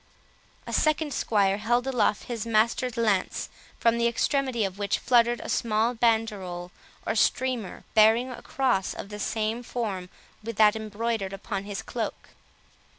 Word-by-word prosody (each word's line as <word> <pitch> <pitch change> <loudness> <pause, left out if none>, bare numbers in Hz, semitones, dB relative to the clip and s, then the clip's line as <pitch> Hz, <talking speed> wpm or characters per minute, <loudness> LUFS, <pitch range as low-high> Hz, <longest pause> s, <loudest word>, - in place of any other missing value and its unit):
A - - -6
second 310 -1 +1
squire 200 -4 +1
held 240 +3 +1
aloft 235 -6 +1
his 235 -3 -4
master's 230 +2 +1
lance, 210 -5 0 0.3
from 230 0 +3
the 235 - +3
extremity 255 0 0
of 195 +1 -6
which 200 -1 0
fluttered 240 -1 +3
a - - -7
small 225 +1 +1
banderole, 210 -7 0 0.3
or - - 0
streamer, 240 -1 0
bearing 225 +4 +5
a 250 - -8
cross 250 -8 0
of - - -7
the 210 0 -7
same 220 +2 -1
form 205 -7 -4 0.3
with 230 +1 -6
that 210 +1 +5
embroidered 220 -2 -3
upon 195 0 -4
his 205 -1 -5
cloak. - - -5
225 Hz, 150 wpm, -27 LUFS, 205-240 Hz, 0.3 s, bearing